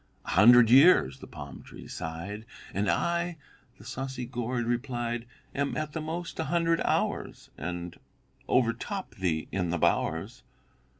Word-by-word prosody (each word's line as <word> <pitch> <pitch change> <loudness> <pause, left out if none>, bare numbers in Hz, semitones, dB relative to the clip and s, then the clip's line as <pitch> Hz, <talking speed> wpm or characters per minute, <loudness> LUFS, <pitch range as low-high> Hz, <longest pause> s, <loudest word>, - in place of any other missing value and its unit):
"A - - -7
hundred 115 +4 +7
years," 135 +1 +6
the - - -10
palm 70 -4 -9
tree - - -12
sighed. 95 +7 -6 0.3
"And 100 0 0
I," 170 - 0 0.4
the 105 - -15
saucy 130 +1 -4
gourd 120 0 -2
replied, 120 -1 -2 0.3
"Am 140 0 -1
at 155 -1 -3
the 160 - -3
most 165 +2 -5
a 160 - 0
hundred 165 +1 +1
hours, - - -1
And 85 +2 -5 0.5
overtop 125 - 0
thee 85 -5 -1
in 90 -3 -1
the 90 - 0
bowers." 80 0 0
120 Hz, 140 wpm, -29 LUFS, 95-140 Hz, 0.5 s, hundred